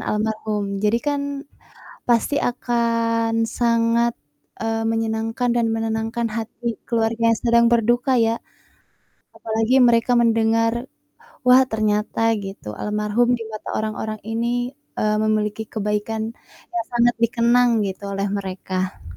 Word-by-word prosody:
almarhum. 210 Hz, -2 st, -2 dB
Jadikan 280 Hz, +6 st, -1 dB, 0.6 s
pasti 240 Hz, +4 st, +2 dB
akan 230 Hz, -2 st, 0 dB, 0.2 s
sangat, 235 Hz, 0 st, +2 dB, 0.5 s
eee, 225 Hz, 0 st, -1 dB
menyenangkan 225 Hz, +2 st, -1 dB
dan 235 Hz, -1 st, +2 dB
menenangkan 225 Hz, +1 st, -2 dB
hati 230 Hz, +1 st, -4 dB
keluarga 230 Hz, 0 st, 0 dB
yang -, -, -6 dB
sedang 235 Hz, -1 st, +4 dB
berduka 240 Hz, +3 st, +2 dB
ya 230 Hz, -1 st, +2 dB, 1.0 s
apalagi 225 Hz, +4 st, +2 dB
mereka 235 Hz, 0 st, +4 dB
mendengar, 230 Hz, +1 st, +2 dB, 0.6 s
"Wah 250 Hz, +1 st, +8 dB
ternyata." 215 Hz, 0 st, 0 dB
Gitu, 195 Hz, -, -7 dB
"Almarhum 210 Hz, +4 st, +1 dB
di -, -, -6 dB
mata 215 Hz, -1 st, -8 dB
orang-orang 215 Hz, 0 st, -3 dB
ini, 235 Hz, +3 st, -1 dB, 0.3 s
eee, 215 Hz, 0 st, +1 dB
memiliki 215 Hz, 0 st, 0 dB
kebaikan 210 Hz, +1 st, -2 dB, 0.5 s
yang 230 Hz, -1 st, -1 dB
sangat 240 Hz, 0 st, +3 dB
dikenang 235 Hz, +1 st, +3 dB
gitu 195 Hz, 0 st, -4 dB
oleh 195 Hz, +1 st, -1 dB
mereka." 190 Hz, -1 st, -4 dB
225 Hz, 110 wpm, -22 LUFS, 215-235 Hz, 1.0 s, Wah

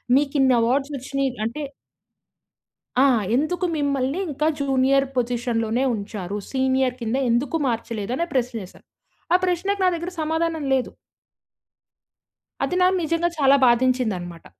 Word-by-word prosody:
మీకిన్ని 275 Hz, -2 st, +3 dB
awards 270 Hz, +5 st, +1 dB
వచ్చినయి". 275 Hz, +1 st, -2 dB
అంటే 240 Hz, +7 st, -4 dB, 1.4 s
ఆ! -, -, +6 dB, 0.3 s
"ఎందుకు 330 Hz, +6 st, 0 dB
మిమ్మల్ని 280 Hz, +1 st, 0 dB
ఇంకా 300 Hz, +2 st, -1 dB
జూనియర్ 275 Hz, 0 st, +2 dB
పొజిషన్‌లోనే 240 Hz, -1 st, 0 dB
ఉంచారు. 200 Hz, -1 st, -5 dB
సీనియర్ 260 Hz, -1 st, +1 dB
కింద 230 Hz, +1 st, -1 dB
ఎందుకు 255 Hz, +7 st, +1 dB
మార్చలేదు?" 230 Hz, -2 st, -3 dB
అని 340 Hz, -, 0 dB
ప్రశ్న 250 Hz, -2 st, 0 dB
వేశారు. 185 Hz, -, -15 dB, 0.5 s
ఆ -, -, +7 dB
ప్రశ్నకి 385 Hz, +3 st, -1 dB
నా 370 Hz, -, +5 dB
దగ్గర 340 Hz, +2 st, -5 dB
సమాధానం 320 Hz, 0 st, -1 dB
లేదు. 260 Hz, -1 st, 0 dB, 1.7 s
అది 360 Hz, -, -1 dB
నాకు 370 Hz, +1 st, +4 dB
నిజంగా 335 Hz, +2 st, +1 dB
చాలా 275 Hz, -1 st, +5 dB
బాధించిందన్నమాట. 230 Hz, -9 st, 0 dB
265 Hz, 120 wpm, -23 LUFS, 235-300 Hz, 1.7 s, ఆ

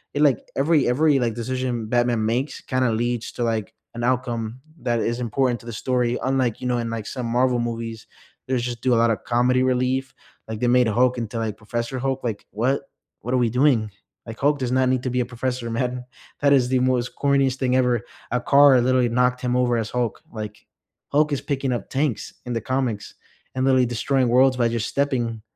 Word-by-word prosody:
it 145 Hz, -, +2 dB
like, 135 Hz, -6 st, +4 dB, 0.2 s
every 145 Hz, 0 st, +3 dB
ever, 145 Hz, +6 st, +2 dB
like, 115 Hz, -3 st, -1 dB
decision 125 Hz, -1 st, -2 dB
Batman 120 Hz, -1 st, +1 dB
makes 125 Hz, +6 st, -1 dB
kinda 130 Hz, -2 st, 0 dB
leads 120 Hz, +1 st, -1 dB
to, 120 Hz, -, -3 dB
like, 110 Hz, -1 st, -2 dB, 0.2 s
an 120 Hz, -, -4 dB
outcome 120 Hz, -2 st, -1 dB, 0.2 s
that 120 Hz, -2 st, 0 dB
is 120 Hz, +2 st, -1 dB
important 125 Hz, 0 st, 0 dB
to 115 Hz, -, -16 dB
the -, -, -4 dB
story, 125 Hz, +1 st, 0 dB
unlike, 130 Hz, -3 st, 0 dB
you 125 Hz, -, -4 dB
know, 125 Hz, -1 st, +1 dB
in, 115 Hz, -1 st, -3 dB
like, 115 Hz, -2 st, -4 dB
some 125 Hz, -2 st, -4 dB
Marvel 125 Hz, +1 st, +2 dB
movies, 115 Hz, -1 st, -4 dB, 0.4 s
there's 125 Hz, -2 st, 0 dB
just 120 Hz, -1 st, -4 dB
do 130 Hz, -, +2 dB
a -, -, +4 dB
lotta 115 Hz, -1 st, +3 dB
comedy 125 Hz, +2 st, +1 dB
relief, 130 Hz, +1 st, 0 dB, 0.3 s
like 110 Hz, -1 st, -5 dB
they 120 Hz, -, +1 dB
made 125 Hz, 0 st, +4 dB
a 110 Hz, -, 0 dB
Hulk 125 Hz, +2 st, +3 dB
into, 115 Hz, 0 st, -4 dB
like, 110 Hz, -2 st, -3 dB
Professor 120 Hz, +4 st, -4 dB
Hulk, 135 Hz, 0 st, -2 dB
like 110 Hz, -4 st, -3 dB
what 125 Hz, +7 st, 0 dB, 0.4 s
what 125 Hz, -, -3 dB
are -, -, +3 dB
we 120 Hz, -2 st, +2 dB
doing? 125 Hz, -3 st, +2 dB, 0.4 s
Like, 115 Hz, -1 st, -9 dB
Hulk 145 Hz, +1 st, +2 dB
does 125 Hz, -2 st, -2 dB
not 130 Hz, 0 st, +3 dB
need 130 Hz, -1 st, 0 dB
to 130 Hz, -, -1 dB
be 125 Hz, -, 0 dB
a -, -, -1 dB
professor, 125 Hz, 0 st, -3 dB
man, 125 Hz, +2 st, -2 dB, 0.4 s
that 140 Hz, -1 st, +5 dB
is 125 Hz, -3 st, +3 dB
the 130 Hz, 0 st, +2 dB
most 125 Hz, -1 st, 0 dB
corniest 140 Hz, -2 st, +2 dB
thing 130 Hz, -1 st, +1 dB
ever, 125 Hz, -3 st, +2 dB, 0.3 s
a 125 Hz, -, 0 dB
car 140 Hz, -1 st, +6 dB
literally 125 Hz, -1 st, +2 dB
knocked 125 Hz, +1 st, +1 dB
him 125 Hz, -1 st, 0 dB
over 125 Hz, -1 st, +2 dB
as 115 Hz, -1 st, -2 dB
Hulk, 120 Hz, -3 st, -2 dB
like, 105 Hz, -2 st, -7 dB, 0.5 s
Hulk 150 Hz, +1 st, +3 dB
is 140 Hz, -, -1 dB
picking 135 Hz, -2 st, -2 dB
up 120 Hz, -5 st, -3 dB
tanks 135 Hz, -3 st, -1 dB
in 125 Hz, -, -3 dB
the 115 Hz, -, -2 dB
comics, 120 Hz, -4 st, -2 dB, 0.4 s
and 130 Hz, -, 0 dB
literally 130 Hz, -1 st, +4 dB
destroying 125 Hz, +2 st, 0 dB
worlds 130 Hz, +2 st, +4 dB
by 120 Hz, -2 st, +3 dB
just 115 Hz, -2 st, -2 dB
stepping. 120 Hz, -6 st, -1 dB
125 Hz, 215 wpm, -23 LUFS, 115-130 Hz, 0.5 s, car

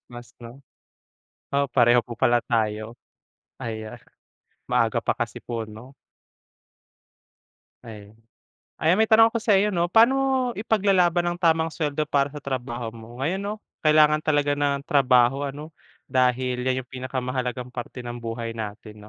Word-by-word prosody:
Breakfast 120 Hz, 0 st, -11 dB
'no, 120 Hz, +4 st, -12 dB, 0.9 s
oh 140 Hz, 0 st, +2 dB
pareho 120 Hz, -1 st, +5 dB
po 120 Hz, -, -7 dB
pala 120 Hz, +1 st, +3 dB
tayo. 110 Hz, -1 st, -1 dB, 0.7 s
Ayan, 110 Hz, -1 st, -6 dB, 0.7 s
maaga -, -, +1 dB
pa -, -, +1 dB
kasi -, -, -4 dB
po 115 Hz, -2 st, -4 dB
'no? 110 Hz, +5 st, -12 dB, 2.0 s
Ayan. 105 Hz, 0 st, -12 dB, 0.6 s
Ayan 165 Hz, +3 st, +3 dB
may 220 Hz, -, +1 dB
tanong 225 Hz, +1 st, +6 dB
ako -, -, +1 dB
sa 210 Hz, -3 st, +4 dB
iyo 210 Hz, +2 st, +1 dB
'no, 170 Hz, 0 st, +1 dB
paano 230 Hz, +6 st, +6 dB
mo 270 Hz, 0 st, +1 dB, 0.3 s
ipaglalaban 190 Hz, -5 st, +2 dB
ang 175 Hz, 0 st, -2 dB
tamang 165 Hz, -2 st, +2 dB
suweldo 150 Hz, -1 st, -1 dB
para 140 Hz, -1 st, +1 dB
sa 150 Hz, -, -8 dB
trabaho 120 Hz, -3 st, -4 dB
mo? 115 Hz, +2 st, -12 dB
Ngayon 185 Hz, +6 st, -1 dB
'no 205 Hz, +1 st, -3 dB, 0.3 s
kailangan 155 Hz, 0 st, +5 dB
talaga 145 Hz, -2 st, +1 dB
ng 145 Hz, -1 st, 0 dB
trabaho 130 Hz, -1 st, +3 dB
ano, 150 Hz, +3 st, -9 dB, 0.3 s
dahil 125 Hz, 0 st, +1 dB
'yan 130 Hz, 0 st, -1 dB
'yung -, -, -43 dB
pinakamahalagang 125 Hz, -1 st, -4 dB
parte 125 Hz, 0 st, -7 dB
ng 120 Hz, -, -5 dB
buhay 115 Hz, 0 st, -4 dB
natin 105 Hz, -1 st, -8 dB
130 Hz, 145 wpm, -24 LUFS, 120-155 Hz, 2.0 s, tanong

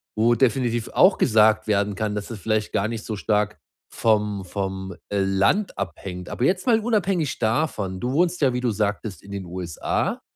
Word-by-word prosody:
wo 115 Hz, +2 st, +3 dB
definitiv 120 Hz, -3 st, +1 dB
auch 185 Hz, +2 st, +5 dB
gesagt 110 Hz, -2 st, +4 dB
werden 100 Hz, -1 st, +1 dB
kann, 105 Hz, +1 st, -2 dB
dass 105 Hz, -, -4 dB
es 110 Hz, -, -6 dB
vielleicht 110 Hz, +3 st, -1 dB
gar 100 Hz, -, +1 dB
nicht 115 Hz, -2 st, -5 dB
so 110 Hz, -, -3 dB
stark 105 Hz, +1 st, 0 dB, 0.4 s
vom 105 Hz, -3 st, +1 dB
vom, 95 Hz, 0 st, -4 dB
äh, 100 Hz, -, 0 dB
Land 100 Hz, -, +1 dB
abhängt. 90 Hz, -1 st, -5 dB
Aber 120 Hz, -, -3 dB
jetzt 185 Hz, -, +1 dB
mal 230 Hz, -2 st, +5 dB
unabhängig 195 Hz, -, 0 dB
davon: 110 Hz, -6 st, -1 dB
Du 125 Hz, +4 st, -2 dB
wohnst 175 Hz, +3 st, +2 dB
ja, 130 Hz, -3 st, +3 dB
wie 125 Hz, -, -1 dB
du 120 Hz, -2 st, +1 dB
sagtest, 105 Hz, -3 st, -2 dB
in 100 Hz, -, -12 dB
den 100 Hz, -2 st, -5 dB
USA. 85 Hz, -2 st, -2 dB
110 Hz, 185 wpm, -23 LUFS, 100-125 Hz, 0.4 s, auch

